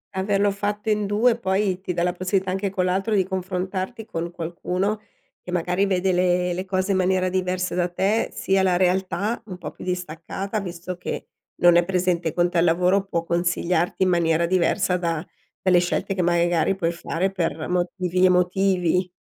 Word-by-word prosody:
Averlo 200 +1 +1
fatto 205 +2 -3
in 210 -1 0
2 230 +4 +2
poi 190 -3 0
ti 185 - -3
dà 170 -1 -1
la 180 0 +1
possibilità 185 +1 -1
anche 195 +1 -1
con 185 -1 -1
l'altro 195 +4 0
di 195 - +4
confrontarti 190 +3 -4
con 170 -6 -4
qualcuno 180 +4 -2 0.4
che 180 - -8
magari 180 +3 +1
vede 190 0 +1
le 180 0 +2
le 185 +2 -4
cose 190 +1 -1
in 190 - +2
maniera 185 0 +2
diversa 185 0 -1
da 180 0 0
te, 195 +5 0
sia 195 0 +1
la 185 -2 +3
realtà, 190 +4 0
un 185 -3 -7
po' - - -7
più - - -12
distaccata 180 +3 -4
visto 180 -1 -6
che 180 - -5 0.3
non 175 0 +7
è 175 - +5
presente 180 -2 0
con 175 +2 +2
te 175 - +1
al - - +4
lavoro, 180 +3 +3
può 170 -4 -2
consigliarti 170 +1 0
in 185 - +3
maniera 170 -1 +2
diversa 180 +1 +1
da 165 -2 -2 0.4
delle 185 -2 +5
scelte 175 +2 -1
che 185 - -1
magari 175 +1 +2
puoi 170 -3 0
fare 170 +2 -2
per 165 -4 -2
motivi 180 0 0
emotivi. 180 0 +2
185 Hz, 180 wpm, -23 LUFS, 175-190 Hz, 0.4 s, non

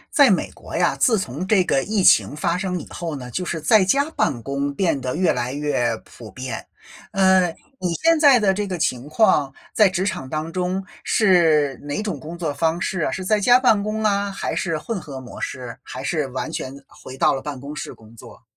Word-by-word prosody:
在 285 -7 +7
美 190 - +1
国 - - -8
呀， - - +2
自 225 -5 +3
从 155 +1 -4
这 195 -2 +3
个 135 - +1
疫 210 -2 0
情 150 - +5
发 170 +3 0
生 180 -1 -2
以 - - -9
后 165 -3 -5
呢， 125 -2 -8
就 180 +8 -3
是 170 - -2
在 210 +6 +5
家 280 +11 +2
办 130 - -1
公 140 +3 -2
变 165 -4 0
得 130 +1 -3
越 180 +1 +3
来 125 +2 -3
越 135 -6 0
普 115 -3 -12
遍。 130 +6 -6 0.5
呃， 190 -2 +4 0.3
你 180 -2 -1
现 330 -1 +4
在 280 -5 +7
的 205 -4 +3
这 205 +1 -2
个 185 -2 -3
情 130 -4 -2
况， 150 -7 +2 0.2
在 210 -2 +5
职 185 0 -1
场 135 -9 -3
当 155 +3 -4
中 185 +1 -2 0.2
是 165 - +3
哪 145 +8 -3
种 210 - -4
工 165 +2 -8
作 160 -4 -2
方 165 +3 0
式 185 +1 -2
啊？ 150 - 0
是 185 +8 -4
在 210 +2 +2
家 245 +5 +6
办 225 -5 +3
公 215 +1 -3
啊？ 200 -1 +1
还 195 - -3
是 165 -4 -1
混 190 +7 -4
合 140 -4 -8
模 125 -2 -10
式？ 125 -1 -6
还 - - -8
是 155 -4 -1
完 130 0 -5
全 130 - -5
回 130 - -12
到 - - +3
了 135 - -2
办 145 -1 -6
公 140 +3 -8
室 - - -6
工 110 0 -18
作？ 115 - -14
170 Hz, 240 characters per minute, -22 LUFS, 140-195 Hz, 0.5 s, 在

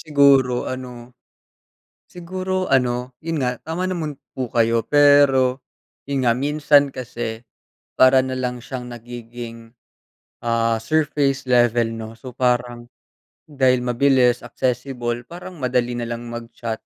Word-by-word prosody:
siguro, 140 -4 +4
ano. 125 -1 -7 0.9
Siguro, 185 +1 -4
ano, 125 -2 +1 0.2
'yon 165 -3 -1
nga, 125 -1 -1
tama 180 +4 -3
naman 160 -5 -3 0.2
po 130 -3 -4
kayo, 115 -1 +2
pero, 140 -3 +4 0.4
'yon 140 -1 -1
nga, 120 -1 +3
minsan 145 0 +3
kasi, 120 -3 -5 0.6
para 130 0 +6
na 130 - -4
lang 125 -2 -3
siyang 125 -2 -6
nagiging, 120 -1 -9 0.7
ah, 115 -1 +1
surface 140 +1 0
level, 120 -2 +3
'no. 110 0 -7
So 120 +2 -11
parang, 120 -1 -1 0.5
dahil 130 -4 +2
mabilis, 125 0 +2
accessible, 120 -1 -2
parang 175 +7 -10
madali 125 -4 -1
na 120 - -3
lang 120 0 -5
mag-chat. 115 -1 -6
125 Hz, 120 wpm, -21 LUFS, 120-140 Hz, 0.9 s, para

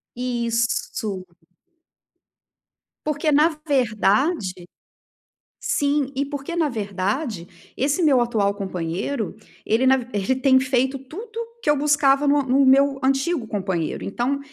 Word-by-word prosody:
Isso! 235 -5 -2 1.8
Porque, 300 +1 0
na 300 +3 +5 0.2
verdade 215 - +1 0.9
Sim. 285 -1 0
E, 280 +2 0
porque 285 +3 -6
na 325 -3 +1
verdade, 200 - -4
esse 280 +6 0
meu 280 -6 +4
atual 210 -4 +1
companheiro, 190 +5 -3 0.3
ele 230 +4 +1
na 265 0 +5
v 245 -2 -5
ele 205 +6 0
tem 260 -1 +4
feito 260 +1 +1
tudo 420 - -8 0.2
que - - -4
eu 295 - +5
buscava 285 -1 +3
no 290 - +4
a - - +2
no 270 +2 +3
meu 275 +1 +4
antigo 270 -1 0
companheiro. 190 -5 -2
Então, 245 +7 -1
260 Hz, 125 wpm, -22 LUFS, 215-285 Hz, 1.8 s, na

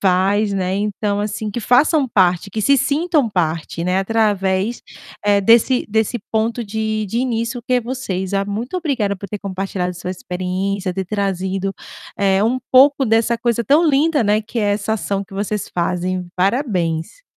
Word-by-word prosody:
faz, 200 +2 +2
né, 185 -1 -1
então, 205 0 -1
assim, 210 +1 -3
que 225 - -4
façam 270 +5 +3
parte, 185 -3 +2
que 215 +3 -3
se 280 +6 +4
sintam 295 -2 +1
parte, 165 -2 -2
né, 180 +1 0
através, 200 0 0 0.4
eh, 205 -1 +4
desse 235 +5 +4
desse 220 +3 0
ponto 225 +2 0
de 215 0 -2
de 225 - -4
início 235 -1 -2
que 255 - -1
é 250 - +3
vocês. 205 -7 -4
Ah, 195 0 +1
muito 225 - -4
obrigada 255 - -1
por 200 - -8
ter 210 +2 -5
compartilhado 185 -2 -3
sua 180 +1 -5
experiência, 185 +1 -3
ter 190 -1 -4
trazido, 195 -1 -2 0.5
eh, 195 +1 +3
um 250 +3 +1
pouco 270 0 +5
dessa 225 +1 +2
coisa 235 -1 0
tão 305 +8 +4
linda, 295 +1 +3
né, 215 0 +2
que 230 +2 -5
é 205 -1 +2
essa 210 +1 -2
ação 200 -2 -2
que 195 - -20
vocês 205 +1 -3
fazem, 180 +1 -1
parabéns. 185 - -1
205 Hz, 170 wpm, -19 LUFS, 190-235 Hz, 0.5 s, pouco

